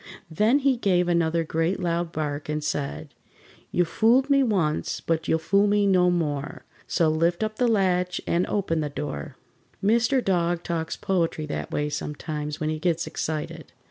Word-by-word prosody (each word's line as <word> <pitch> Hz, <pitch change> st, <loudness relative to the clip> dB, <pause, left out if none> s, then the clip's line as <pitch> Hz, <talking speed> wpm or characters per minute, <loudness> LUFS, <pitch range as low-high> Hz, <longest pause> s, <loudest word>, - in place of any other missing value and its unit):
Then 215 Hz, -, +3 dB
he 275 Hz, -3 st, +2 dB
gave 180 Hz, -5 st, +2 dB
another 170 Hz, -1 st, +1 dB
great 165 Hz, +3 st, -1 dB
loud 170 Hz, -1 st, -1 dB
bark 150 Hz, -2 st, -4 dB
and 150 Hz, 0 st, -2 dB
said: 110 Hz, -, -3 dB, 0.6 s
"You 175 Hz, -, +2 dB
fooled 240 Hz, -, +3 dB
me 275 Hz, 0 st, +5 dB
once, 185 Hz, -, 0 dB
but 165 Hz, -1 st, -1 dB
you'll 160 Hz, -, +3 dB
fool 200 Hz, +5 st, +2 dB
me 205 Hz, 0 st, +3 dB
no 180 Hz, -2 st, +4 dB
more, 150 Hz, -5 st, -2 dB, 0.2 s
So 170 Hz, -3 st, +2 dB
lift 165 Hz, +5 st, +1 dB
up 215 Hz, 0 st, -3 dB
the 250 Hz, -, +2 dB
latch 180 Hz, -4 st, +1 dB
and 175 Hz, +1 st, +1 dB
open 185 Hz, -6 st, -1 dB
the 150 Hz, -1 st, -2 dB
door!" 145 Hz, 0 st, -5 dB, 0.5 s
Mr. 235 Hz, +5 st, +2 dB
Dog 175 Hz, -2 st, +1 dB
talks 165 Hz, -1 st, -3 dB
poetry 165 Hz, -4 st, -1 dB
that 150 Hz, -, -4 dB
way 150 Hz, -, -1 dB
sometimes 150 Hz, 0 st, -4 dB
when 155 Hz, 0 st, -1 dB
he 155 Hz, -, -3 dB
gets 170 Hz, 0 st, 0 dB
excited. 155 Hz, -1 st, -5 dB
170 Hz, 170 wpm, -25 LUFS, 155-195 Hz, 0.6 s, me